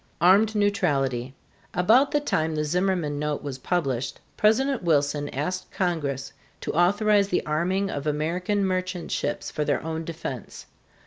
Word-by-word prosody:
ARMED 200 +6 +5
NEUTRALITY. 140 - 0 0.4
About 230 +10 +5
the 295 - +2
time 160 - 0
the 150 - 0
Zimmerman 175 -2 0
note 150 -1 -2
was 135 -2 -5
published, 135 -7 -1 0.2
President 260 +5 +2
Wilson 145 -3 +1
asked 180 +7 -3
Congress 140 -7 -2 0.3
to - - -3
authorize 200 +4 +3
the 180 - 0
arming 185 +6 0
of 145 +1 -4
American 180 +7 0
merchant 185 -1 -2
ships - - -2
for 150 - -1
their - - 0
own 160 0 -3
defense. 155 - -6
170 Hz, 140 wpm, -25 LUFS, 145-195 Hz, 0.4 s, ARMED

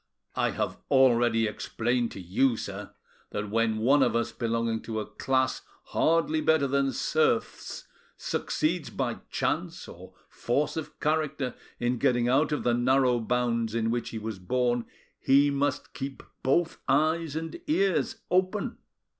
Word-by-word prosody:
"I - - +1
have - - -2
already 120 -4 +4
explained 120 +2 -1
to - - -8
you, 110 +7 +1
sir, 100 0 -7 0.3
that 105 0 -4
when 115 0 +1
one 135 +6 +4
of 120 -3 +3
us 115 - 0
belonging 115 -1 -1
to 110 -1 -4
a 105 - -3
class 130 +4 0 0.3
hardly 160 -1 +2
better 160 -3 +3
than 140 0 +1
serfs 155 -7 0 0.3
succeeds - - -1
by - - -3
chance - - -2
or - - -12
force 140 +5 -1
of 160 -2 -6
character 150 -4 0 0.3
in 120 0 0
getting 120 -3 +2
out 145 +5 +3
of 150 - -1
the 120 - +2
narrow 125 0 +3
bounds 115 -1 0
in 115 -1 +1
which 120 0 -2
he 115 - -6
was 110 -2 -5
born, 120 +4 0 0.3
he 140 +2 +4
must 140 0 -1
keep 135 0 -6 0.2
both 165 +5 +1
eyes 155 +2 +2
and 165 - -5
ears 195 - +1 0.2
open. 185 +3 0
125 Hz, 145 wpm, -28 LUFS, 115-145 Hz, 0.3 s, already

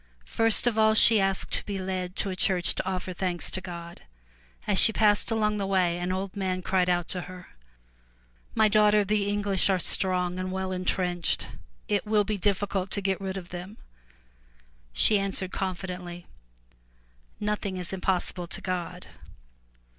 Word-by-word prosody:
First 225 0 +3
of 230 -2 +1
all 220 0 +4
she 220 0 +7
asked 195 -1 0
to - - 0
be 200 -1 -3
led 185 -1 -4
to 195 - -2
a - - -4
church 185 -1 +1
to 190 - -3
offer 185 0 -4
thanks 180 -1 -1
to 190 - -2
God. 170 -2 -9 0.6
As 205 -2 +3
she 225 - +8
passed 210 -1 +2
along 210 -2 0
the 200 -1 -2
way, 180 -3 +1
an 180 +1 -2
old 190 +1 -4
man 185 -2 -2
cried 185 -1 +1
out 175 -1 0
to 180 - -3
her, 185 -1 -11 1.1
*'My 220 -1 +4
daughter, 210 0 +4
the 205 0 0
English 200 -2 +1
are 190 - +3
strong 180 0 -1
and 185 0 -3
well 190 0 -3
intrenched. 180 -1 -1 0.4
It 105 - -1
will 210 -1 +3
be 205 0 -3
difficult 195 -1 0
to 200 - 0
get 195 0 -1
rid 190 0 -4
of 180 -2 -8
them! 180 +4 -8 0.6
'' - - -34 0.3
She 200 - +5
answered 195 -1 -2
confidently, 180 -2 -5 1.1
"Nothing 210 -2 -3
is 180 0 -4
impossible 180 -1 -2
to - - -4
God.'' 180 -2 -5
190 Hz, 170 wpm, -27 LUFS, 180-205 Hz, 1.1 s, she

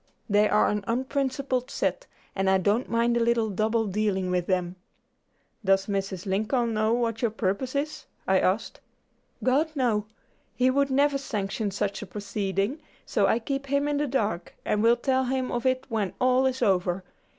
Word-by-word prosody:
They 210 0 +3
are 210 - +4
an 210 -1 -1
unprincipled 260 +1 -1
set, - - -2 0.3
and 195 -1 +1
I 190 - +5
don't 205 +6 +1
mind 235 +1 +2
a 235 - +2
little 230 -2 +1
double 220 +3 +1
dealing 195 -2 0
with 180 -1 0
them." 180 -1 0 0.9
"Does 195 0 +3
Mr. 195 -2 -3
Lincoln 220 +5 0
know 215 +1 +1
what 230 -1 0
your 235 - +2
purpose 220 +5 -2
is?" 295 +2 -3 0.2
I - - +4
asked. - - 0 0.6
"God! 280 +5 +2
no; 225 -6 +1 0.5
he 255 0 +3
would 280 +1 +2
never 280 +1 +2
sanction 210 -4 -2
such 200 0 -2
a 210 - -7
proceeding, 200 - -2 0.3
so - - +2
I - - +3
keep 275 +4 -3
him 280 +1 +1
in 290 -1 0
the 295 0 0
dark, 215 -9 -2
and 210 - +1
will 230 +2 +5
tell 260 +1 +1
him 260 0 -1
of 240 +1 -1
it 255 0 +1
when 220 -6 -1
all 255 +1 +3
is 260 0 -1
over. 185 -1 +1
225 Hz, 175 wpm, -26 LUFS, 200-260 Hz, 0.9 s, I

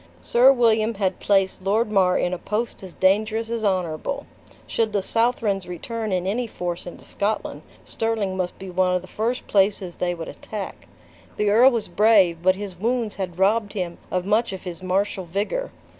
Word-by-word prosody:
Sir 250 +3 +5
William 225 -3 +2
had 190 -2 -1
placed 195 -2 +1
Lord 210 +4 +1
Mar 185 -3 +3
in 180 - 0
a 180 - -3
post 215 +5 -3
as 185 -3 -10
dangerous 215 +4 +1
as 230 -1 -2
honorable. 185 - -1 0.4
Should 220 -2 -1
the 200 -2 +1
Southrons 225 -4 0
return 215 +5 -4
in 180 -1 0
any 230 +5 -1
force 175 -4 -4
into 175 - -10
Scotland, 210 +2 -2 0.2
Stirling 220 -4 -1
must 185 -1 -3
be 190 -1 -8
one 180 0 +2
of 180 - -1
the - - -11
first 230 +6 -2
places 195 -3 +1
they 175 -1 -1
would 165 -1 -7
attack. 210 -3 -7 0.5
The 210 -1 +2
earl 240 +5 +7
was 235 -4 -2
brave, 190 -3 +4
but 185 +1 +4
his 195 -3 -7
wounds 230 0 -1
had 180 -3 -4
robbed 205 +2 +2
him 180 -4 -4
of 180 0 -1
much 215 +3 +2
of 190 - -7
his 180 -2 -6
martial 190 +1 -1
vigor. 205 - -2
200 Hz, 185 wpm, -23 LUFS, 185-225 Hz, 0.5 s, earl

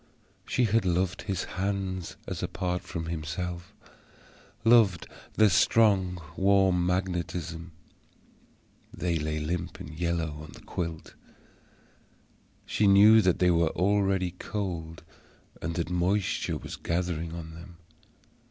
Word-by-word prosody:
She 125 - +1
had 115 -1 +2
loved 90 0 0
his 95 -3 -2
hands 95 -2 -3
as - - -5
apart 90 0 -2
from 85 -3 -5
himself; 85 +3 -4 0.9
loved 110 -7 +5 0.3
their 110 - +6
strong 95 -3 +3 0.2
warm 95 -2 +3
magnetism. 90 -2 -2 1.2
They 85 -2 -1
lay 75 +1 -2
limp 85 +3 -3
and 75 - -8
yellow 80 -2 -2
on 75 - -11
the - - -14
quilt: 85 -2 -5 1.5
she 105 - +1
knew 105 +3 +8
that 95 -3 +2
they 90 -1 +3
were 85 -1 +3
already 95 -1 +1
cold, 85 -6 -4 0.6
and 85 +1 -3
that 85 -1 -2
moisture 90 +3 0
was - - -8
gathering 85 -1 -2
on 80 -1 -8
them. 85 +1 -12
90 Hz, 115 wpm, -28 LUFS, 85-95 Hz, 1.5 s, knew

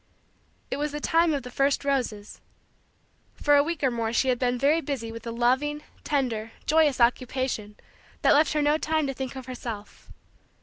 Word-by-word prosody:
It - - -1
was 295 +1 -2
the 295 - -3
time 330 +2 +3
of 285 -4 -1
the 250 - -8
first 275 +2 +1
roses. 240 -7 -2 0.9
For 290 0 +3
a 285 - +6
week 320 0 -3
or 265 - +3
more 230 -1 -2
she 260 +3 +1
had 250 -1 +1
been 250 -1 +1
very 290 +6 +3
busy 260 -7 -4
with 230 +1 -9
a - - -3
loving, 260 +6 +1 0.2
tender, 230 -6 -1
joyous, 305 -3 +3
occupation 245 -3 0 0.5
that - - +6
left 305 +2 +4
her 300 -1 +1
no 295 +1 +3
time 315 -1 0
to 270 - -2
think 265 0 -5
of 260 -1 -7
herself. 235 -5 -8
265 Hz, 185 wpm, -26 LUFS, 240-295 Hz, 0.9 s, a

